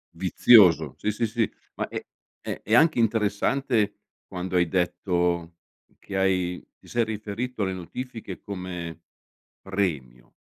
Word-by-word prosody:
Vizioso, 100 -8 +5
sì, 105 - -1
sì, 115 +3 -1
sì. 115 0 0 0.2
Ma - - -2
è - - -6 0.4
ehm, - - -5
è 110 - +2
anche 155 -1 +5
interessante 115 +1 +1 0.3
quando 90 0 -3
hai 85 -1 +3
detto 90 -1 0 0.4
che 100 - -6
hai 90 -2 +1
ti - - -20
sei 120 -1 +1
riferito 110 +2 -4
alle 95 -1 -1
notifiche 110 +2 -7
come 90 -4 -6 0.6
"premio." 75 -11 -3
95 Hz, 125 wpm, -26 LUFS, 90-115 Hz, 0.6 s, Vizioso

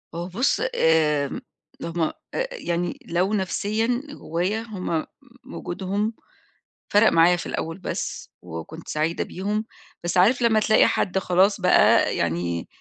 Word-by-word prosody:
هو 170 +1 -4
بُص، 240 - 0
آمم 150 -3 +2 0.4
ل - - -6
هم 170 0 -3
أ 160 - +1 0.4
يعني 175 - -3
لو 180 +4 0
نَفْسيًا 215 +5 0
جوّايا 185 - -2
هم 185 -8 -3 0.4
م - - -12
وجودهم 200 +5 -2 0.8
فَرَق 210 +2 +5
معايا 170 +2 +5
في 170 - -6
الأول 165 +2 -4
بس - - -4
وكنت 90 - -8
سعيدة 155 +2 -1
بيهم، 210 +4 -3 0.4
بس 175 +1 -1
عارف 235 +8 +4
لمّا 225 -2 +4
تلاقي 215 +1 +4
حد 190 -1 0
خلاص 190 +2 +2
بقى - - +4
يعني 85 0 -1
180 Hz, 135 wpm, -24 LUFS, 165-210 Hz, 0.8 s, فَرَق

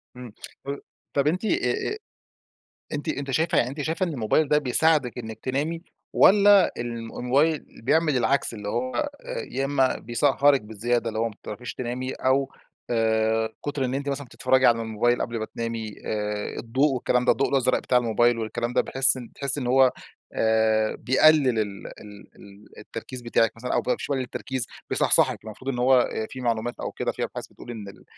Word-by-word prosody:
امم، 125 -4 -10 0.8
طب 140 0 +1
أنتِ 185 +7 0
أ 125 - 0
أ - - -6 1.0
أنتِ 145 +2 -3
أنتِ 140 -2 -3
شايفة 160 +4 +1
يعني 120 - +2
أنتِ 145 +2 -5
شايفة 165 +5 -1
إن 165 - -4
الموبايل 130 +5 +1
ده 150 - +3
بيساعدِك 145 -2 +2
إنك 110 -2 -7
تنامي، 150 +6 -2 0.3
والّا 200 0 +6
ال 120 - -3
الموبايل 130 +7 0 0.2
بيعمل 155 0 +2
العكس، 125 +1 +1
اللي 105 -2 -7
هو 130 - -2 0.4
يا 135 - -1
إمّا 135 -2 +1
بيسهرِك 140 +3 +2
بزيادة 115 +2 -2
اللي 110 - -4
هو 115 0 0
ما 105 - -14
بتعرفيش 120 +4 -7
تنامي 130 +1 -4
أو 135 +1 +1 0.4
آآ، 110 -1 +1 0.2
كُتر 145 -2 -1
إن 125 - -3
أنتِ 140 +1 -2
مثلًا 140 0 -3
بتتفرجي 130 +2 +1
على 115 -1 +3
الموبايل 115 +2 0
قبل 115 -1 -3
ما 110 - -2
تنامي 115 -2 -4
آآ 105 -1 -3
الضوء 130 +5 +1
والكلام 125 0 0
ده - - +5
الضوء 135 - +1
الأزرق 130 -2 +2
بتاع 125 - +1
الموبايل 120 0 +2
والكلام 120 +2 -3
ده، - - +3
باحس 135 0 +4
بتحسِي 135 +3 -2
إن 125 - -3
هو 130 0 +5 0.4
آآ 110 -1 +2
بيقلل 135 -3 +4
ال 100 -2 -4
ال 105 -1 -12
ال 100 +1 -16
التركيز 130 -1 -8
بتاعِك 115 -1 +2
مثلًا 120 +2 -4
أو - - +1 0.2
مش - - -5
بيقلل 135 -3 -1
التركيز، 130 -1 -4 0.2
بيصحصحِك؟ - - +3
المفروض 130 +5 -5
إن 120 - -4
هو 130 0 +5
آآ 110 - -3
في 130 - -8
معلومات 120 0 -1
أو - - -4
كده - - -2
في - - -4
أبحاث - - -5
بتقول 120 - -11
إن 105 -4 -8
ال 100 - -15
125 Hz, 180 wpm, -25 LUFS, 115-140 Hz, 1.0 s, والّا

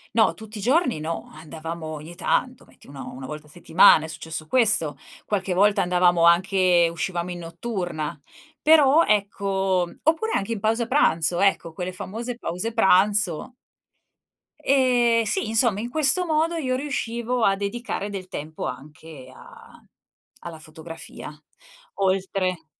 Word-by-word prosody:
No, 225 -1 +4
tutti 220 0 -10
i - - -6
giorni 255 - +1
no. 165 +2 -5
Andavamo 160 +1 -8
ogni 155 +2 -8
tanto, 250 +8 -1
metti - - -21
uno 140 -1 -9
una 130 +1 -8
volta 150 +2 -8
a - - -21
settimana, 165 0 +5
è - - -5
successo 160 0 -7
questo. 180 - +1 0.3
Qualche 195 -3 -1
volta 200 +3 +3
andavamo 175 -1 +3
anche 180 0 +4
uscivamo 175 +1 -3
in 175 - -6
notturna. 170 -3 -5 0.4
Però 310 0 +5
ecco 195 -3 0
oppure 325 +8 +1
anche 195 +3 -2
in 225 - -2
pausa 225 +3 0
pranzo, 175 - +2
ecco, 195 -4 +1
quelle 180 +3 -5
famose 230 +6 -6
pause 220 +2 -4
pranzo. 200 0 +2 1.0
Ehm, 245 -4 +3
sì 375 - -1
insomma, 225 -2 +2
in 235 +3 -4
questo 310 +6 +2
modo 325 +1 +1
io 260 -6 -1
riuscivo 245 -3 -2
a 195 -2 +4
dedicare 205 +1 -4
del 195 -2 -6
tempo 155 -2 -6
anche 145 +1 -9
a - - -16 0.6
alla 165 -2 -8
fotografia; 160 +1 -10 0.6
oltre 185 -3 -1
195 Hz, 140 wpm, -23 LUFS, 165-235 Hz, 1.0 s, settimana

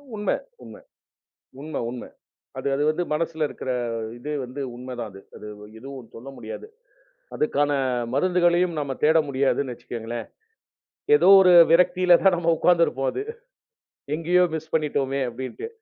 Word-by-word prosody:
உண்ம 210 -1 -3 0.3
உண்ம. - - -11 0.9
உண்ம 155 0 -5
உண்ம. 125 0 -7 0.5
அது - - -4
அது 145 - 0
வந்து 175 +3 -1
மனசுல 160 0 -1
இருக்கற, 130 - -5 0.5
இது 145 +5 -7
வந்து 130 +3 -7
உண்மதான் 125 -2 -7
அது. 95 0 -13
அது 105 - -10 0.3
எதுவும் 130 -1 -10
சொல்ல 125 +4 -10
முடியாது. - - -8 0.7
அதுக்கான 145 -1 0 0.4
மருந்துகளையும் 175 +2 +2
நம்ம 140 -2 -3
தேட 160 +2 +5
முடியாதுன்னு 135 -1 0
வச்சுக்கங்களேன். 115 0 -7 0.9
ஏதோ - - +3
ஒரு 180 -1 +6 0.2
விரக்தியில 180 +1 +5
தான் 190 -2 +5
நம்ம 170 0 +2
உக்காந்திருப்போம் 160 -8 +2
அது. - - -4 0.9
"எங்கயோ 175 +3 +2
மிஸ் 160 0 -7
பண்ணிட்டோமே!" 140 -3 -1
அப்டின்ட்டு. 130 - -7
150 Hz, 130 wpm, -24 LUFS, 130-175 Hz, 0.9 s, ஒரு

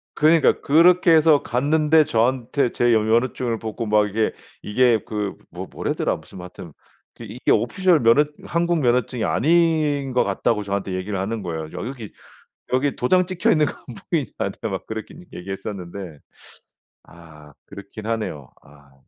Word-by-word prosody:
그러니까 155 +1 +4
그렇게 170 +4 +4
해서 155 -2 +5
갔는데 150 +4 +2
저한테 125 0 0
제 120 - -1
면허증을 115 +1 +1
보고 110 0 -5
막 105 0 +2
이게 110 +2 0 0.3
이게 120 +1 +2
그 105 -2 -4
뭐 - - -7
뭐라더라 - - -2
무슨 - - -14
뭐 90 - -8
하여튼 90 -3 -11 0.4
그 - - -10
이게 - - -3
오피셜 175 +6 +2
면허 115 +6 +5 0.2
한국 170 0 0
면허증이 125 -3 0
아닌 155 -2 +1
것 125 - +3
같다고 105 +2 0
저한테 100 -1 -3
얘기를 95 +1 -3
하는 105 +2 -3
거예요. 80 -3 -5
"여기, 120 -5 -7 0.6
여기 135 +2 +1
도장 180 +9 +2
찍혀 185 -1 0
있는 155 -2 +3
거 - - -2 0.2
안 120 - -9 0.2
보이냐." 150 -8 +1
나한테 - - -3
막 - - -5
그렇게 110 0 -7 0.2
얘기했었는데 95 -3 -7 0.8
아 75 -4 -16
그렇긴 100 +2 -10
하네요. 105 - -4
아. 70 -1 -20
그 65 - -30
115 Hz, 335 characters per minute, -22 LUFS, 100-150 Hz, 0.8 s, 해서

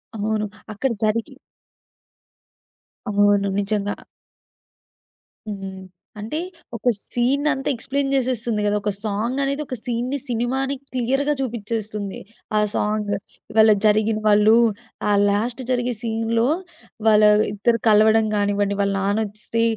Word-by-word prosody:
అవును. 215 0 -1 0.3
అక్కడ 250 +5 -1
జరిగి 215 +1 0 1.7
అవును. 205 -1 +3
నిజంగా. 205 0 -1 1.5
హ్మ్. 195 -2 -6 0.4
అంటే 225 +10 -3 0.4
ఒక 245 +2 0 0.2
సీనంతా 270 +3 +1
ఎక్స్‌ప్లేన్ 275 +4 -2
జేసేస్తుంది 240 -4 0
గదా! 205 0 +2
ఒక 210 - -1
సాంగ్ 220 +5 -1
అనేది 280 +2 -1
ఒక 255 - -5
సీన్‌ని, 245 +3 -2
సినిమాని 265 +4 -1 0.2
క్లియర్‌గా 270 +4 +1
చూపించేస్తుంది 215 -4 -4 0.4
ఆ - - +4
సాంగు. 210 -1 0 0.4
ఇవాళ 220 0 +6
జరిగిన 215 +1 +3
వాళ్ళు 210 +2 +6 0.5
ఆ - - +3 0.2
లాస్ట్ 230 +6 -1
జరిగే 245 0 0
సీన్‌లో 230 +1 0 0.6
వాళ్ళ 215 -1 +6 0.3
ఇద్దరు 230 +3 +1
కలవడం 215 +1 +5
గానివ్వండి, 205 0 0
వాళ్ళ 200 0 +1
నాన్న 205 +3 +1
ఒస్తే 230 +2 -2
220 Hz, 110 wpm, -22 LUFS, 205-245 Hz, 1.7 s, ఇవాళ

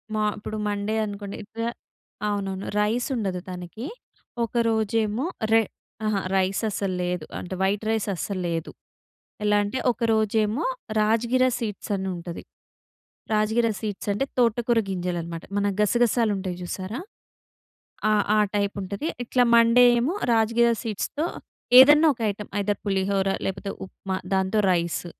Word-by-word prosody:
మా 215 - +1
ఇప్పుడు 215 +1 -5
మండే 205 +1 -1
అనుకోండి 200 -1 -6
ఎక్స 225 +2 -8 0.7
అవునవును 195 -2 -2
రైస్ 225 +4 +1
ఉండదు 195 -6 -2
తనకి. 180 +7 -7 0.6
ఒక 230 - -4 0.2
రోజేమో 220 +2 0 0.3
రెహ్ 225 -2 +4 0.4
అహా! 215 -2 +1 0.2
రైస్ 190 +2 +1
అస్సలు 195 -2 -2
లేదు. 180 -3 -2
అంటే 180 - -6
వైట్ 200 +2 +1
రైస్ 220 -1 0
అస్సలు 185 +2 -3
లేదు. 165 -1 -3 0.7
ఎలా 210 0 +3
అంటే 205 +5 -3
ఒక - - -10
రోజేమో 220 +5 +1 0.4
రాజగిర 235 +4 +2
సీడ్స్ 210 -4 -5
అని 190 0 -3
ఉంటది. 170 0 -7 0.9
రాజగిర 220 +2 +2
సీడ్స్ 210 -3 -5
అంటే, 235 +7 0
తోటకూర 235 0 +3
గింజలనమాట. 175 -2 -3
మన 205 0 +2
గసగసాలు 230 0 +3
ఉంటాయి 185 -2 -4
చూసారా 190 - -5 1.1
ఆ! - - +4 0.2
ఆ - - +5 0.2
టైప్ 200 0 0
ఉంటది. 200 +10 -4 0.2
ఇట్లా 245 +1 +2
మండే 230 +1 +6 0.2
ఏమో 275 +9 0 0.2
రాజగిర 230 +1 +3
సీడ్స్‌తో 235 - -2 0.5
ఏదన్నా 295 +4 +8
ఒక 235 - -11
ఐటెమ్ 205 +1 -9
ఐదర్ 205 0 -1
పులిహోరా 195 0 +1
లేకపోతే 195 +1 -3
ఉప్మా, 190 0 -5 0.2
దాంతో 190 +2 +2
రైస్. 170 0 0
210 Hz, 135 wpm, -25 LUFS, 190-230 Hz, 1.1 s, ఏదన్నా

